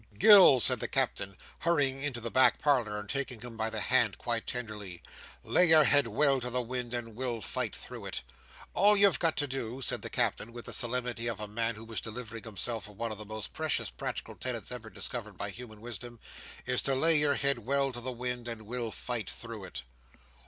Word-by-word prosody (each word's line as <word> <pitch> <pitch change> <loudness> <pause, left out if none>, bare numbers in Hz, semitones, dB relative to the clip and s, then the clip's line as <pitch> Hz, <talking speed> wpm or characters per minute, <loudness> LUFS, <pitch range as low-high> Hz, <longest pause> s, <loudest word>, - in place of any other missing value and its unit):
"Gills!" 185 - +8
said - - +4
the - - -2
Captain, 100 -1 -1 0.2
hurrying 140 -6 +1
into 135 -4 -1
the 115 0 -4
back 130 0 +5
parlour, 120 -8 +1
and 105 - -8
taking 135 -2 -3
him 120 -2 -9
by 110 0 -1
the 110 -1 -3
hand 120 -6 +2
quite 115 -2 -2
tenderly. 105 -7 -5 0.4
"Lay 180 - +3
your 160 -1 +7
head 145 -3 +5
well 135 +4 +3
to 125 - -2
the 125 +1 -1
wind, 125 0 -3
and 115 -2 -4
we'll 120 -1 -2
fight 90 - -3
through - - -8
it. - - -4 0.5
All 205 +3 +5
you've 200 -1 +6
got 165 -2 +2
to 145 - +3
do," 130 -2 -4
said 130 - -1
the - - -5
Captain, 115 - -1
with 120 0 -9
the - - -6
solemnity 120 -1 -2
of 115 -3 -3
a 105 - -3
man 115 +2 -1
who 110 +1 -10
was 110 -4 -4
delivering 115 0 -7
himself 110 0 -3
of 105 - -16
one 115 0 -3
of 105 - -6
the 105 - -7
most 110 -2 -7
precious - - -1
practical - - -5
tenets 125 -3 -4
ever 120 -3 -6
discovered 110 -4 -5
by 100 - -3
human 110 -1 -10
wisdom, 120 0 -7 0.5
"is 125 0 +2
to 135 - +1
lay 160 +5 +5
your 145 -1 +3
head 140 -2 +1
well 135 +4 0
to 120 -1 -5
the 130 +2 -3
wind, 125 0 -4
and 115 -2 -5
we'll 120 +1 -4
fight 120 0 -4
through 115 -4 -7
it!" 90 - -7
120 Hz, 215 wpm, -30 LUFS, 110-130 Hz, 0.5 s, Gills